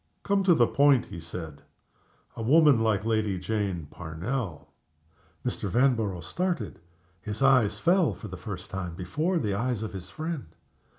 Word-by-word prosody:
"To -, -, -15 dB
come 200 Hz, -1 st, +3 dB
to 175 Hz, -3 st, +6 dB
the 120 Hz, -, +5 dB
point," 140 Hz, 0 st, +4 dB
he 85 Hz, -, -8 dB
said 80 Hz, -2 st, -8 dB, 0.7 s
"a -, -, -6 dB
woman 145 Hz, +1 st, +5 dB
like 110 Hz, -2 st, +1 dB
Lady 110 Hz, -4 st, +1 dB
Jane 95 Hz, -3 st, -2 dB
Parnell." 85 Hz, -, -5 dB, 0.7 s
Mr. 100 Hz, -, -2 dB
Vanborough 115 Hz, -5 st, +2 dB
started. 145 Hz, -, -2 dB, 0.4 s
His 105 Hz, +6 st, -3 dB
eyes 125 Hz, -7 st, +4 dB
fell, 175 Hz, -, +3 dB
for 110 Hz, -, -9 dB
the 95 Hz, -, -7 dB
first 95 Hz, +1 st, -7 dB
time, 90 Hz, -3 st, -4 dB
before 155 Hz, -, -1 dB
the 105 Hz, -10 st, 0 dB
eyes 115 Hz, +1 st, -1 dB
of 110 Hz, -, -5 dB
his 95 Hz, -2 st, -7 dB
friend. 155 Hz, -, -4 dB
110 Hz, 160 wpm, -27 LUFS, 95-135 Hz, 0.7 s, to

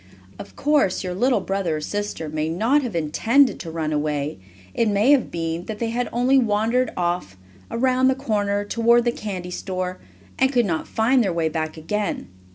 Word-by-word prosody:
Of -, -, -10 dB
course 285 Hz, -12 st, +2 dB
your 180 Hz, -1 st, -3 dB
little 245 Hz, +7 st, +2 dB
brother 190 Hz, -5 st, -1 dB
or -, -, -3 dB
sister 205 Hz, -2 st, -4 dB
may 155 Hz, +1 st, -2 dB
not 225 Hz, -, +2 dB
have 240 Hz, -8 st, -4 dB
intended 230 Hz, -, +2 dB
to 165 Hz, -, -6 dB
run 160 Hz, -1 st, -2 dB
away, 150 Hz, -3 st, -2 dB, 0.3 s
it 230 Hz, -2 st, +1 dB
may 210 Hz, +6 st, +3 dB
have 280 Hz, -5 st, +3 dB
been 165 Hz, +1 st, -3 dB
that 220 Hz, -, -5 dB
they 230 Hz, +1 st, -2 dB, 0.2 s
only 250 Hz, +3 st, +3 dB
wandered 230 Hz, +2 st, +1 dB
off, 175 Hz, -, -2 dB, 0.3 s
around 255 Hz, +2 st, +2 dB
the 260 Hz, -, +3 dB
corner, 205 Hz, -6 st, -1 dB
toward 235 Hz, +2 st, +3 dB
the 240 Hz, -, +3 dB
candy 190 Hz, -6 st, -6 dB
store, 185 Hz, 0 st, -4 dB, 0.4 s
and 265 Hz, 0 st, +3 dB
could 245 Hz, -4 st, +3 dB
not 165 Hz, -5 st, -2 dB
find 240 Hz, +3 st, +2 dB
their 195 Hz, -, 0 dB
way 165 Hz, -2 st, 0 dB
back 155 Hz, 0 st, -3 dB
again. 205 Hz, +6 st, -3 dB
205 Hz, 180 wpm, -23 LUFS, 165-240 Hz, 0.4 s, may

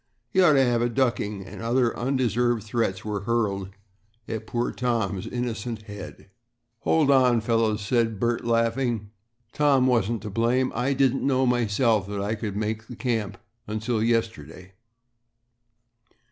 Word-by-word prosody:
"He 190 Hz, -, +3 dB
ought 175 Hz, -4 st, +6 dB
to 135 Hz, -1 st, +4 dB
have 120 Hz, -1 st, +1 dB
a 120 Hz, -, +1 dB
ducking," 110 Hz, -6 st, -1 dB
and -, -, -9 dB
other 120 Hz, +1 st, +1 dB
undeserved 120 Hz, -3 st, 0 dB
threats 105 Hz, -4 st, -2 dB
were 105 Hz, -1 st, -2 dB
hurled 100 Hz, -3 st, -1 dB, 0.6 s
at 110 Hz, -1 st, -5 dB
poor 120 Hz, 0 st, -1 dB
Tom's 110 Hz, -7 st, -1 dB
innocent 120 Hz, -2 st, -4 dB
head. 100 Hz, -2 st, -10 dB, 0.5 s
"Hold 150 Hz, +2 st, +2 dB
on, 125 Hz, -3 st, +4 dB
fellows," 115 Hz, -1 st, +1 dB
said 115 Hz, -3 st, +1 dB
Bert, 120 Hz, +1 st, 0 dB
laughing; 115 Hz, -2 st, 0 dB, 0.4 s
"Tom 140 Hz, -4 st, +3 dB
wasn't 115 Hz, -3 st, +1 dB
to 105 Hz, -, -5 dB
blame. 120 Hz, +5 st, +1 dB
I 125 Hz, +4 st, 0 dB
didn't 135 Hz, -1 st, +2 dB
know 130 Hz, -1 st, +2 dB
myself 115 Hz, -3 st, +2 dB
that 100 Hz, 0 st, -4 dB
I 100 Hz, +2 st, -1 dB
could 105 Hz, -2 st, -4 dB
make 110 Hz, +1 st, -3 dB
the 120 Hz, -, -8 dB
camp 115 Hz, -5 st, -2 dB, 0.4 s
till 110 Hz, 0 st, -1 dB
yesterday." 110 Hz, -7 st, -2 dB
115 Hz, 145 wpm, -25 LUFS, 105-125 Hz, 0.6 s, ought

